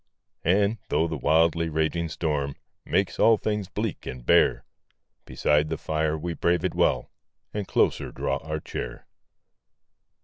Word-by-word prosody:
And, 100 +5 +2
though 80 - +2
the 80 - -3
wildly 80 +3 +2
raging 80 +2 0
storm 75 -4 -2 0.3
Makes - - 0
all 115 -1 +6
things 105 -2 -2
bleak 105 +1 -4
and 65 -2 -7
bare, - - +4 0.6
Beside 75 +1 +1
the 80 - -2
fire 80 0 -1
we 85 +2 -3
brave 85 +2 +1
it 90 - 0
well, - - +1 0.4
And 105 -2 -3
closer - - +1
draw - - -1
our 80 +1 -4
chair. - - -6
80 Hz, 140 wpm, -26 LUFS, 75-95 Hz, 0.6 s, all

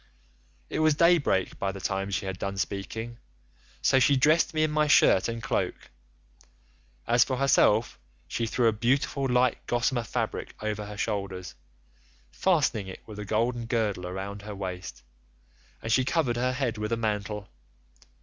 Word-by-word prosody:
"It - - -3
was 155 -1 +4
day 170 +2 +5
break 95 -10 -1
by 95 - -1
the 95 - -8
time 95 +1 -2
she 100 0 -2
had 95 -1 -4
done 100 0 -3
speaking, 110 +5 -4 0.6
so 135 - +5
she 140 +1 +4
dressed 155 +5 +4
me 155 -1 +1
in 155 - +1
my 150 0 +2
shirt 95 -9 +5
and 115 0 -4
cloak. - - -2 1.1
As 120 +1 +5
for 130 - -3
herself 120 -4 +3 0.3
she 115 - -2
threw 120 +1 +2
a - - +5
beautiful 135 +4 0
light 125 -1 +2
gossamer 120 +1 +1
fabric 115 - -4
over 105 -1 -3
her 105 0 -8
shoulders, 100 -4 -3 0.8
fastening 145 - +1
it 95 - -9
with 105 -1 -9
a 105 - -5
golden 115 +3 0
girdle 105 -6 -1
round 100 +2 -5
her 105 0 -7
waist, 90 -6 -6 0.8
and 115 - -3
she 130 +3 +4
covered 130 -3 +1
her 125 +1 0
head 125 -4 -2
with 105 +1 -3
a 115 - +1
mantle. 105 -2 -2
115 Hz, 165 wpm, -27 LUFS, 100-130 Hz, 1.1 s, day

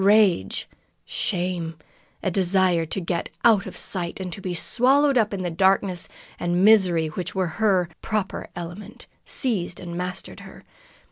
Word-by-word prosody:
Rage, 200 - +3 0.4
shame, 175 -3 -2 0.5
a 190 - 0
desire 180 -2 +2
to 195 - -2
get 170 -1 -2 0.2
out 220 -4 +5
of - - -8
sight, 175 -3 -2
to 190 +1 -5
be 185 -2 -3
swallowed 270 - +3
up 220 -4 +3
in 195 -2 -3
the 175 - -2
darkness 190 0 +2 0.3
and 175 +2 +1
misery 185 -7 +5
which 175 +5 -5
were 190 -1 +1 0.2
her 190 -5 +3
proper 215 -3 -3
element, 175 +3 -8 0.2
seized 200 -10 -1
and 170 -1 -7
mastered 180 +1 -5
her. - - -13
185 Hz, 145 wpm, -24 LUFS, 175-200 Hz, 0.5 s, out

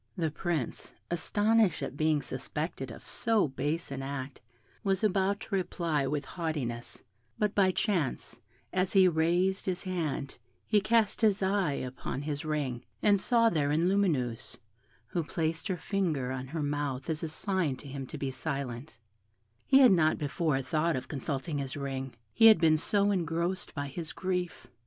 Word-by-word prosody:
The 160 -3 0
Prince, 155 -5 -3 0.2
astonished 205 -1 +2
at 135 - -4
being 155 -1 +1
suspected 135 +1 -4
of 115 - -10
so 225 -6 +1
base 145 +5 -2
an 135 -1 -4
act, 135 -1 -5 0.4
was 195 0 +1
about 200 0 +2
to 220 - -8
reply 170 -6 0
with 145 0 -2
haughtiness, 140 -10 -4 0.3
but 210 -1 +1
by 195 -2 +4
chance, 185 - -1 0.3
as 185 0 +1
he 190 -2 +7
raised 175 +4 +1
his 185 -1 -1
hand, 155 -7 -3 0.3
he 210 -2 +3
cast 220 0 +2
his 210 -3 +3
eyes 190 -9 +1
upon 130 +2 -5
his 145 +1 -3
ring, 145 -6 -2 0.2
and 200 -2 +4
saw 230 0 +4
therein 155 -3 +2
Lumineuse, 150 - 0 0.5
who 170 +8 -2
placed 160 +3 -2
her 185 -3 -1
finger 160 -10 -1
on 130 0 -4
her 155 +2 -3
mouth 145 -3 -2
as 160 -1 -2
a 165 - -3
sign 180 -4 -1
to 140 - -12
him 135 -1 -6
to - - -7
be 135 -1 -2
silent; 135 -2 -5 0.7
he 270 0 +7
had 255 -4 +8
not 160 -4 +4
before 145 -2 0
thought 155 +4 +1
of 130 - -4
consulting 145 +1 -3
his 135 0 -4
ring, 135 -2 -4 0.2
he 225 - +7
had 220 -5 +8
been 160 -2 +5
so 200 +6 +2
engrossed 170 0 -1
by 145 -2 -2
his 150 +3 -6
grief. 180 -2 -3
160 Hz, 165 wpm, -30 LUFS, 140-190 Hz, 0.7 s, had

